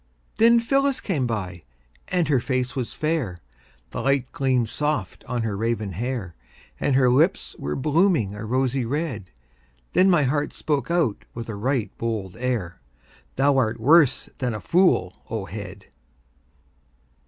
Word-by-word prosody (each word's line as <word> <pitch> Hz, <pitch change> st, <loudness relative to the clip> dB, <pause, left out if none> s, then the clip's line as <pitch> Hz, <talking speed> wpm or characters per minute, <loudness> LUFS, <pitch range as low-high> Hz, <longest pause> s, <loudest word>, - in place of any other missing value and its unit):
Then 235 Hz, +1 st, +6 dB
Phyllis 275 Hz, +3 st, +1 dB
came 145 Hz, -, -1 dB
by, 95 Hz, -7 st, -4 dB, 0.5 s
and 180 Hz, -3 st, +1 dB
her 140 Hz, -4 st, +3 dB
face 125 Hz, 0 st, -2 dB
was 125 Hz, -3 st, -3 dB
fair, 150 Hz, -, -1 dB, 0.5 s
The -, -, -4 dB
light 135 Hz, -2 st, +1 dB
gleamed 130 Hz, -4 st, +1 dB
soft 150 Hz, -10 st, -2 dB
on 120 Hz, -2 st, -2 dB
her 110 Hz, -3 st, -2 dB
raven 110 Hz, -1 st, -1 dB
hair; 110 Hz, -2 st, -4 dB, 0.5 s
And 140 Hz, -, +1 dB
her 130 Hz, -1 st, +4 dB
lips 160 Hz, +9 st, +2 dB
were 75 Hz, +1 st, -3 dB
blooming 150 Hz, -, +2 dB
a 105 Hz, +1 st, -7 dB
rosy 130 Hz, +3 st, 0 dB
red. 125 Hz, -, -3 dB, 0.6 s
Then 185 Hz, +2 st, +5 dB
my 175 Hz, -5 st, +4 dB
heart 145 Hz, +2 st, -1 dB
spoke 145 Hz, -3 st, -1 dB
out 165 Hz, -11 st, +1 dB
with 115 Hz, 0 st, -6 dB
a 110 Hz, -, -4 dB
right 120 Hz, +2 st, -1 dB
bold 110 Hz, -5 st, -3 dB
air: 115 Hz, -, -2 dB, 0.5 s
"Thou 140 Hz, +1 st, +3 dB
art 115 Hz, -3 st, +1 dB
worse 145 Hz, +3 st, +4 dB
than 125 Hz, -4 st, -1 dB
a -, -, -4 dB
fool, 175 Hz, -, +2 dB
O 110 Hz, -3 st, -3 dB
head!" 100 Hz, +1 st, -8 dB
125 Hz, 150 wpm, -24 LUFS, 110-150 Hz, 0.6 s, Then